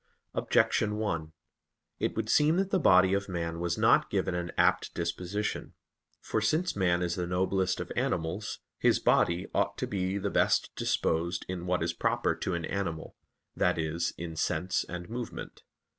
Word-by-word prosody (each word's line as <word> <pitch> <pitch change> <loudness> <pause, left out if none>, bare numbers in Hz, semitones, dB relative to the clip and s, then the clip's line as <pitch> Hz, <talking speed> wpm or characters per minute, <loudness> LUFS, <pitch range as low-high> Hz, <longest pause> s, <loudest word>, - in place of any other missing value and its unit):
Objection 105 0 +2
1: 85 -8 -2 0.7
It - - -1
would - - -2
seem 155 +3 +4
that 195 0 0
the 190 - +3
body 95 - +5
of 100 0 -1
man 85 -2 -3
was 85 0 -1
not - - +4
given 90 - 0
an 85 -1 -3
apt - - +3
disposition. 90 +5 -3 0.4
For 110 - -2
since 155 +11 +1
man 90 -3 +2
is 85 -1 0
the 90 0 -2
noblest 95 +1 0
of - - -5
animals, 80 +6 -1 0.2
his - - +4
body 85 +2 +2
ought - - 0
to - - -1
be 95 -1 -1
the 100 0 -2
best - - +2
disposed 85 +2 0
in 90 -1 -5
what 90 -2 +1
is 85 0 -1
proper - - +1
to 95 - -3
an 85 -1 -3
animal, 85 -5 -4 0.4
that 90 -1 +2
is, 80 +1 -1
in 85 -1 -6
sense 90 +3 0
and 90 -1 -6
movement. 120 +1 -6
90 Hz, 170 wpm, -29 LUFS, 85-100 Hz, 0.7 s, body